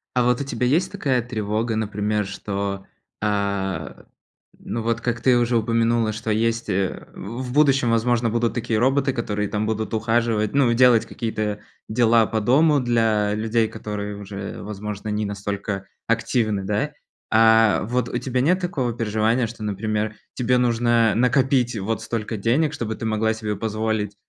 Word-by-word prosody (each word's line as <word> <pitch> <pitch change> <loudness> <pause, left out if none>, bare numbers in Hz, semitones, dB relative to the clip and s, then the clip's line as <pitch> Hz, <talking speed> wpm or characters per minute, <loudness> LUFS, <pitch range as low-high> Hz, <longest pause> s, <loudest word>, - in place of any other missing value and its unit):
А 125 - +3
вот 125 0 +2
у 140 - -3
тебя 125 -2 -2
есть 165 +9 +2
такая 135 -11 +1
тревога, 110 -1 -2
например, 105 -1 -1
что, 100 0 -4 0.4
а, 100 -6 -2 0.5
ну, 115 - -4
вот 115 +1 -1
как 120 -1 -1
ты 125 +1 +4
уже 120 0 +2
упомянула, 115 0 +1
что 110 +1 -3
есть, 115 +1 0
э, 95 -1 -2
в 120 +5 -6
будущем, 135 -3 +3
возможно, 115 0 +2
будут 115 +1 0
такие 115 -2 -1
роботы, 135 +3 +2
которые 105 -4 -2
там 105 +1 -1
будут 110 +1 -2
ухаживать, 110 -1 +1
ну, 135 -4 +3
и - - +3
делать 120 -1 +5
какие-то 110 -2 -3 0.3
дела 115 0 +4
по 110 - -1
дому 145 +7 +4
для 115 -4 +1
людей, 110 +1 +1
которые 105 -2 -5
уже, 100 -1 -7
возможно, 105 0 -6
не 105 0 -1
настолько 100 -1 -4 0.2
активны, 115 -3 0
да? 105 +10 -1 0.4
А 110 -1 +5
вот 125 +2 -1
у 120 - -2
тебя 125 +1 -2
нет 180 +8 +2
такого 135 -10 -1
переживания, 115 +1 +1
что, 110 0 -9
например, 105 +1 -2 0.2
тебе 125 0 +1
нужно 120 -2 +3
накопить 125 0 +2
вот 110 +3 -2
столько 115 -1 -3
денег, 125 +9 +1
чтобы 110 -5 -3
ты 115 - -6
могла 110 0 +1
себе 105 -2 -4
позволить 110 -1 -2
115 Hz, 160 wpm, -23 LUFS, 105-120 Hz, 0.5 s, делать